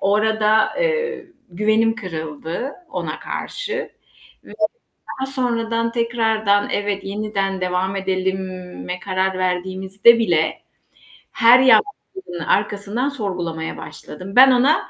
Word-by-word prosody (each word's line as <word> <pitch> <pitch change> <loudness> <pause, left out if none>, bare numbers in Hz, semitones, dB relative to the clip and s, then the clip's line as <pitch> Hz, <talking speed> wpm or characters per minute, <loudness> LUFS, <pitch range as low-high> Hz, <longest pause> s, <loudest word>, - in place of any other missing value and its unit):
O 200 +1 +2
arada, 220 0 +2
eee, 475 -4 -1 0.2
güvenim 215 +4 +2
kırıldı 165 - -5 0.2
ona - - -4
karşı 480 0 -4 0.5
ve - - -13 0.7
daha 265 - -1
sonradan, 230 -3 -1
tekrardan 225 -3 +1
evet, 205 -1 -2
yeniden 195 -2 -2
devam 185 +1 -1
edelime 185 -1 -3
karar 190 0 -1
verdiğimizde 190 +5 +3
bile, 160 -7 +1 0.7
her 235 +2 +6
yaklaşımın 380 - +1
arkasından 205 +5 0
sorgulamaya 180 - -4
başladım. 185 +6 -9
Ben 260 +1 +9
ona 255 +5 +3
205 Hz, 100 wpm, -20 LUFS, 185-235 Hz, 0.7 s, Ben